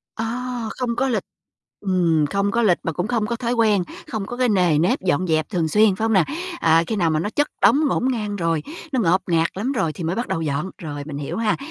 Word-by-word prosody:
À! 240 +2 -3
Không 240 -2 -1
có 270 +2 +1
lịch. 235 - 0 0.6
Ừm, 175 -6 +2
không 200 0 +1
có 235 +3 +1
lịch 190 -6 +4
mà 165 - -2
cũng 175 +5 -2
không 230 -2 0
có 235 +2 -2
thói 235 0 -2
quen, 220 -5 +3 0.3
không 220 -6 -3
có 245 - -6
cái 250 0 +2
nề 180 -7 +3
nếp 170 +4 +2
dọn 185 -1 +1
dẹp 155 -2 +1
thường 170 -5 0
xuyên, 210 +2 +4
phải 220 - -2
hông 225 - +1
nè? 190 - +5 0.4
À, 165 0 +4
khi 220 - -2
nào 170 -5 +2
mà 155 -1 +1
nó 205 - -2
chất 290 +6 +1 0.2
đống 255 +8 +5
ngổn 260 -1 0
ngang 210 -4 -3
rồi, 165 -4 0 0.3
nó 260 - +1
ngộp 185 -2 +2
ngạt 165 0 +3
lắm 235 +8 -1
rồi 165 - 0
thì 170 - -7
mới 170 +3 -1
bắt 235 - -2
đầu 165 - -1
dọn. 150 +4 -2
Rồi, 145 -3 -6
mình 145 -1 -7
hiểu 145 - -4
ha. 225 -2 +1
200 Hz, 255 wpm, -22 LUFS, 165-230 Hz, 0.6 s, nè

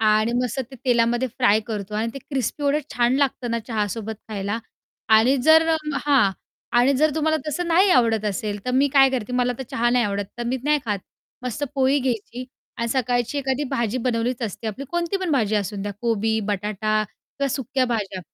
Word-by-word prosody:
आणि 215 +1 +3
मस्त 250 +2 -2
ते 265 - -10
तेलामध्ये 240 0 +2
फ्राय 220 -2 +3
करतो 210 -2 -5
आणि 220 +2 0
ते - - -5
क्रिस्पी 275 +1 -3
एवढं 285 +2 +2
छान 245 +1 +2
लागतं 265 -3 0
ना 230 - 0
चहासोबत 220 0 -2
खायला 205 +1 -3 0.6
आणि 250 +5 +4
जर 320 +1 +7
अं, 305 -3 0
हां 270 -9 +4 0.5
आणि 250 +3 +4
जर 310 +2 +3
तुम्हाला 315 0 +1
तसं 345 +4 -2
नाही 370 +4 +4
आवडत 225 - +3
असेल, 205 0 -2
तर 250 - -1
मी 265 +3 +3
काय 270 -1 +7
करते 250 -2 -3
मला 250 0 +1
तर - - -3
चहा 240 +1 +1
नाही 245 -2 +3
आवडत, 200 0 -1
तर - - -2
मी 255 - 0
नाही 300 0 +3
खात. 205 -3 -1 0.4
मस्त 250 +3 -4
पोळी 270 +1 +3
घ्यायची 250 -1 -3 0.3
आणि 235 0 -2
सकाळची 245 +2 0
एखादी 270 +1 -1
भाजी 235 +1 -1
बनवलीच 240 0 -1
असते 225 +1 -4
आपली. 220 +6 -4
कोणती 345 +2 -1
पण 375 -3 -3
भाजी 220 -6 +1
असून 200 0 -2
द्या 205 - -3
कोबी, 225 -1 +1
बटाटा 210 +2 0
किंवा 280 0 -5
सुक्या 265 0 -1
भाज्या. 210 -6 -2
245 Hz, 195 wpm, -23 LUFS, 215-270 Hz, 0.6 s, जर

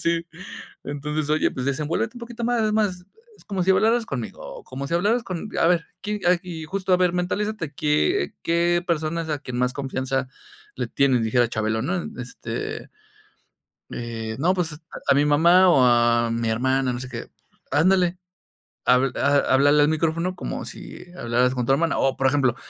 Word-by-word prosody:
Sí, 170 0 0 0.6
entonces: 150 +1 -3
"Oye, 155 - +2
pues 130 0 -4
desenvuélvete 155 - -1
un - - -9
poquito 235 0 -6
más, 240 -1 +1
es 215 - +1
más, 200 -5 0 0.3
es - - -20
como 195 -3 -2
si 185 - +2
hablaras 225 +4 +2
conmigo, - - -5 0.2
o 475 - -12
como 140 +1 -6
si 170 - -2
hablaras 210 +8 +2
con, 190 +1 -5
a - - +4
ver, 170 -1 +2 0.2
quién, 210 0 -3
ah 180 +1 +5
y 170 -3 -7
justo, 190 +3 -2
a - - +7
ver, 180 -1 +2
mentalízate, 180 -1 -2
qué 150 - +1
qué 170 +1 +2
persona 165 0 -1
es 160 - -8
a 150 - -1
quien 125 -3 -5
más 125 0 +1
confianza 135 -1 -2 0.5
le - - -2
tienes", 130 -4 +2
dijera 120 +2 +2
Chabelo, 110 0 -1
¿no?, 175 +6 -1 0.2
este 125 0 -6 1.0
"Eh, 115 -2 -5
no, 175 +7 +2
pues, 165 -4 -3 0.3
a - - +6
mi 145 +1 +3
mamá 170 +5 +5
o 135 -7 +5
a 120 -1 +3
mi 115 0 -1
hermana, 130 +3 +1
no 120 - -4
sé 130 - -6
qué, 115 -2 -7 0.4
'ándale, 180 +4 +3 0.7
habl 125 +1 +4
a 140 0 +3
háblale 145 +2 +5
al 145 - +4
micrófono 165 +3 0
como 180 - -5
si - - -9
hablaras 120 +2 +1
con 125 -1 -1
tu 135 - +1
hermana, 160 +4 +1
o, 135 -1 +1
por 135 - +2
ejemplo, 130 -3 +2
155 Hz, 190 wpm, -23 LUFS, 130-180 Hz, 1.0 s, a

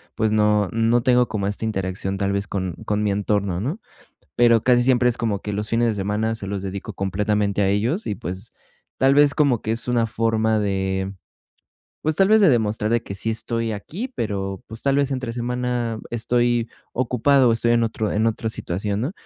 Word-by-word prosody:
pues 110 -1 +1
no 105 -1 +3
no 115 +1 +2
tengo 125 -1 +4
como 100 -2 -3
esta 105 +2 -2
interacción 95 -2 -2
tal 100 0 0
vez 100 0 -1
con 95 -2 -3
con 105 0 0
mi 105 - +1
entorno, 100 -2 -1
¿no? 145 - -3 0.6
Pero 115 -2 +4
casi 125 -1 +4
siempre 125 -1 +3
es 125 0 +1
como 105 -4 -1
que, 105 - -3
los 105 +1 -3
fines 115 0 +2
de - - 0
semana 105 +3 -1
se 105 -3 -6
los 100 -1 -4
dedico 95 0 -5
completamente 100 +1 0
a 100 - +3
ellos 115 - 0
y, 105 - -2
pues, 95 +4 -7 0.4
tal 135 +1 +4
vez 145 0 +4
como 140 -7 +2
que 110 - -2
es 115 - -3
una 120 -2 +2
forma 110 0 +1
de, 95 -1 -1 0.9
pues, 155 0 0
tal 195 +2 +4
vez 220 0 +5
de 190 - +6
demostrar 110 -3 0
de 115 0 +2
que 100 - -7
sí 110 +3 -1
estoy 115 0 -1
aquí, 170 - -5
pero, 95 -3 -3
pues 110 +1 -10
tal 140 0 +2
vez 140 -1 +1
entre 130 -3 -3
semana 120 -1 -2
estoy 120 0 +1 0.2
ocupado 130 +2 +3
o - - +4
estoy 115 +1 +1
en 120 0 +3
otro 110 -1 -1
en 110 +2 +1
otra 110 0 -1
situación, 100 +1 -3
¿no? 135 +9 -2
110 Hz, 205 wpm, -22 LUFS, 100-120 Hz, 0.9 s, de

